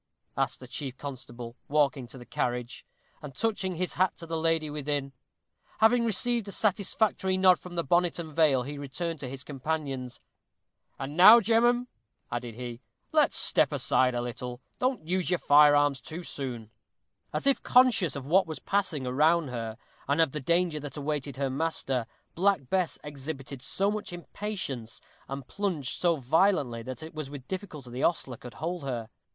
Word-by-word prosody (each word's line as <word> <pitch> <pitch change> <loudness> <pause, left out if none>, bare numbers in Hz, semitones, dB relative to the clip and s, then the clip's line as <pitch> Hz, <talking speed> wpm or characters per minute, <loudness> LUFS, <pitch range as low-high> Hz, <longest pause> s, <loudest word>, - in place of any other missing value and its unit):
asked - - -1
the 130 - -10
chief 130 +1 -5
constable, 125 -4 -8
walking 140 -3 +1
to 130 - -10
the 120 - -11
carriage, 125 +1 -3 0.3
and 140 -3 -9
touching 200 -4 -1
his 180 +2 -2
hat 185 0 +1
to 165 - -8
the 165 0 -4
lady 165 -1 +1
within. 145 -2 -3 0.6
Having 235 +2 +4
received 230 +1 +1
a - - -5
satisfactory 195 -1 +1
nod 185 -1 +5
from 180 -1 -10
the 170 - 0
bonnet 175 +4 +2
and 160 -3 -6
veil, 145 -6 +4
he 145 +2 -6
returned 160 +4 -4
to 130 - -5
his 130 0 -7
companions. 135 -3 -4 0.8
"And 140 +2 -5
now, 210 +7 +10
gemmen," 235 +3 +3 0.5
added 120 -2 -4
he, 120 -1 -7 0.3
"let's - - +3
step - - +3
aside 125 -1 +2
a 120 - -1
little. 125 0 -5 0.2
Don't 255 -10 0
use 180 +1 0
your 180 - +2
fire 145 -1 +6
arms 145 -2 +2
too 165 +3 -7
soon." 120 -8 -5 0.6
As - - -3
if 275 -1 +3
conscious 245 - +4
of 140 -2 -5
what 180 +5 +4
was 160 - -5
passing 185 -9 -1
around 155 +4 +3
her, 115 -2 -4 0.3
and 140 +3 +1
of 160 -4 +4
the 150 - -4
danger 170 +1 +1
that 145 -2 -7
awaited 145 -2 -3
her 135 -1 -1
master, 135 -5 -1 0.3
Black 180 -7 +1
Bess 185 -4 +1
exhibited 140 -2 -6
so 195 +9 +1
much 215 -1 -4
impatience, 175 - -5 0.3
and 135 -1 -6
plunged 170 -11 -2
so 175 -2 +4
violently, 140 -3 +2
that 130 +6 -7
it 160 - -9
was 155 -3 -5
with 140 -2 -9
difficulty 160 -10 -6
the 125 +2 -4
ostler 135 -7 0
could 125 +1 -11
hold 170 +7 -3
her. 120 -5 -3
150 Hz, 175 wpm, -28 LUFS, 130-180 Hz, 0.8 s, now